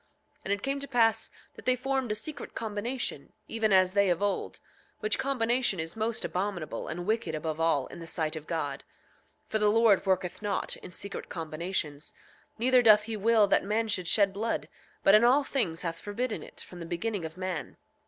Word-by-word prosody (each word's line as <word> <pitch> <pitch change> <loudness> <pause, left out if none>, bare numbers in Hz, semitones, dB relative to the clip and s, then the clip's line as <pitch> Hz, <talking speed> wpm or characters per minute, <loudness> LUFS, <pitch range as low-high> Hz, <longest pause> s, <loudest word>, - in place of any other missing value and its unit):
8:18 - - -43
And 195 - +1
it 200 - -4
came 275 +1 -1
to 280 - -5
pass 225 -4 +2 0.2
that - - -14
they 255 0 +4
formed 265 -2 -1
a - - +1
secret 295 +8 -6
combination, 220 - -3
even 225 -1 0
as 185 -1 +5
they 200 -1 +4
of 175 -1 +2
old; 205 0 -1 0.4
which 215 0 +1
combination 245 -6 +1
is 160 +1 -4
most 220 +1 -1
abominable 185 -3 -3
and 175 +2 -4
wicked 215 -6 0
above 155 0 -3
all, 165 -5 +2
in - - -10
the 165 - -8
sight 160 -1 -1
of 155 0 -7
God; 145 -4 -3 0.6
8:19 - - -40
For 220 - 0
the 210 0 +4
Lord 220 -2 +5
worketh 185 -1 0
not 205 -2 -2
in - - -11
secret 200 +3 -5
combinations, 160 -2 -3 0.4
neither 250 +2 +5
doth 215 -3 +7
he 225 +1 -4
will 215 +1 +4
that 200 - +3
man 220 +3 0
should 185 -5 0
shed 200 0 +4
blood, 220 +4 -2 0.3
but 195 - +6
in 215 +2 +7
all 260 +4 +5
things 190 -13 -1
hath 165 -1 -3
forbidden 225 +3 -3
it, - - -10
from 180 - -10
the 170 - -6
beginning 190 +3 -2
of 160 +1 -7
man. 185 -4 -4
205 Hz, 205 wpm, -29 LUFS, 175-225 Hz, 0.6 s, doth